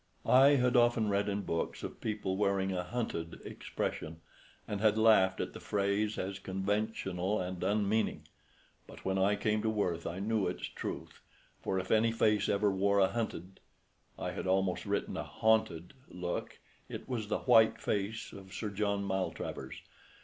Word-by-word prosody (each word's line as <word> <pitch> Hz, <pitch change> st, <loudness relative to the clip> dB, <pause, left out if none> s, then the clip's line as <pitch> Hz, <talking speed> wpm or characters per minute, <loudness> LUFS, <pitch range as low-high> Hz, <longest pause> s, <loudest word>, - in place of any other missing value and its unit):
I 135 Hz, +3 st, +7 dB
had 125 Hz, -2 st, +2 dB
often 120 Hz, -3 st, +4 dB
read 100 Hz, +1 st, +1 dB
in 100 Hz, 0 st, -2 dB
books 85 Hz, -, -3 dB
of -, -, -7 dB
people 105 Hz, -3 st, -2 dB
wearing 100 Hz, -1 st, +1 dB
a 90 Hz, -1 st, -1 dB
"hunted" 90 Hz, -6 st, -4 dB
expression, 80 Hz, +1 st, -4 dB, 0.5 s
and 105 Hz, -1 st, -3 dB
had 110 Hz, -1 st, +4 dB
laughed 105 Hz, -4 st, +5 dB
at -, -, -3 dB
the -, -, -8 dB
phrase 105 Hz, +1 st, 0 dB
as 95 Hz, +1 st, -3 dB
conventional 95 Hz, 0 st, -1 dB
and 90 Hz, 0 st, -4 dB
unmeaning. 105 Hz, +2 st, 0 dB, 0.6 s
But -, -, -13 dB
when 95 Hz, 0 st, +1 dB
I 100 Hz, +2 st, +3 dB
came 105 Hz, +1 st, 0 dB
to 110 Hz, -, 0 dB
Worth 90 Hz, -6 st, -1 dB
I 85 Hz, -, -4 dB
knew 105 Hz, 0 st, 0 dB
its -, -, -4 dB
truth; -, -, -6 dB, 0.4 s
for 95 Hz, -, -1 dB
if 95 Hz, 0 st, -3 dB
any 115 Hz, +1 st, +4 dB
face 105 Hz, -2 st, +2 dB
ever 100 Hz, 0 st, +2 dB
wore 100 Hz, +1 st, +2 dB
a 95 Hz, -1 st, +5 dB
hunted 95 Hz, -5 st, -4 dB, 0.6 s
I -, -, -3 dB
had -, -, -5 dB
almost 95 Hz, -1 st, +1 dB
written -, -, -1 dB
a -, -, -2 dB
haunted 110 Hz, -6 st, +1 dB, 0.2 s
look, 90 Hz, -1 st, -4 dB, 0.3 s
it -, -, -7 dB
was 115 Hz, -5 st, -3 dB
the 105 Hz, -, -1 dB
white 110 Hz, -3 st, +5 dB
face 105 Hz, +2 st, -2 dB
of 95 Hz, -1 st, -11 dB
Sir 105 Hz, -2 st, -3 dB
John 100 Hz, 0 st, -1 dB
Maltravers. 95 Hz, -8 st, -4 dB
100 Hz, 165 wpm, -32 LUFS, 95-110 Hz, 0.6 s, I